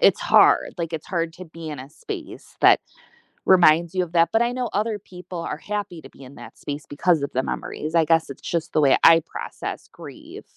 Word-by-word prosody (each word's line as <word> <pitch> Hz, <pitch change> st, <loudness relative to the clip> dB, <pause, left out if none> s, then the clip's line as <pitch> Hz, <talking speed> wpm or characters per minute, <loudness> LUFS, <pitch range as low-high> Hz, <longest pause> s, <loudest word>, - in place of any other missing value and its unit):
It's -, -, +4 dB
hard, -, -, +4 dB
like, 170 Hz, -1 st, -3 dB
it's 160 Hz, -1 st, -5 dB
hard 165 Hz, -3 st, -2 dB
to 185 Hz, -, -10 dB
be 165 Hz, -1 st, -10 dB
in 150 Hz, -2 st, -6 dB
a 135 Hz, +2 st, -11 dB
space -, -, -9 dB
that -, -, +6 dB, 0.7 s
reminds 170 Hz, -2 st, +5 dB
you 185 Hz, -, +2 dB
of 170 Hz, -, -8 dB
that, 165 Hz, -1 st, +4 dB
but 225 Hz, -, +2 dB
I 240 Hz, 0 st, +1 dB
know 250 Hz, -1 st, -3 dB
other 210 Hz, +1 st, -1 dB
people 180 Hz, -2 st, -10 dB
are 165 Hz, -, -4 dB
happy 205 Hz, -2 st, -5 dB
to -, -, -13 dB
be -, -, -16 dB
in 130 Hz, +2 st, -13 dB
that -, -, -12 dB
space 145 Hz, +1 st, -6 dB
because 155 Hz, +1 st, +1 dB
of 140 Hz, -, -3 dB
the 130 Hz, -, 0 dB
memories, 155 Hz, +4 st, -5 dB
I 165 Hz, -, +4 dB
guess 165 Hz, -1 st, +2 dB
it's 140 Hz, -, -9 dB
just 170 Hz, -2 st, -3 dB
the 155 Hz, -, +3 dB
way 140 Hz, -2 st, +5 dB
I 165 Hz, 0 st, +7 dB
process -, -, -7 dB
grief. -, -, -11 dB
165 Hz, 225 wpm, -23 LUFS, 155-185 Hz, 0.7 s, I